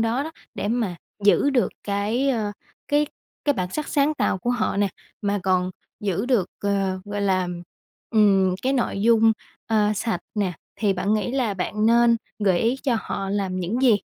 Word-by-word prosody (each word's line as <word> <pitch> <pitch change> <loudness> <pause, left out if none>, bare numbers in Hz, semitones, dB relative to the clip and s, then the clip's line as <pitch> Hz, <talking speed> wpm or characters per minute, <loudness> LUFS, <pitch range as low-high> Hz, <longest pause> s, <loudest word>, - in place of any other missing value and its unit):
đó 230 +4 +1
đó, 320 - -5 0.2
để 205 - -2
mà 220 -6 0 0.3
giữ 245 +7 +5
được 255 -3 +2 0.2
cái, 210 +7 0
ờ, 215 -5 0 0.4
cái 295 +1 +3 0.4
cái 290 - +4
bản 180 -7 -3
sắc 305 +6 -3
sáng 290 +1 +2
tạo 190 - 0
của 240 - -1
họ 235 -4 0
nè, 200 -1 +2 0.3
mà 200 0 +1
còn 185 -1 +1 0.3
giữ 200 +2 -1
được, 215 -9 +2
à, 195 -2 0
gọi 205 0 -4
là, 185 -2 +1 0.6
ừm, 195 -4 +4
cái 265 +1 +1
nội 235 -6 0
dung, 225 -1 +5 0.3
à, 215 -2 +2
sạch 225 +2 -1
nè, 200 -4 0 0.2
thì 205 -3 +2
bạn 195 +3 0
nghĩ 215 +3 0
là 250 -6 0
bạn 210 +3 -1
nên 235 0 +5 0.2
gợi 190 -4 +3
ý 235 +3 +2
cho 255 -5 +2
họ 195 - -4
làm 190 -2 -1
những 215 +9 -1
gì? 240 -5 +6
210 Hz, 185 wpm, -24 LUFS, 195-240 Hz, 0.6 s, gì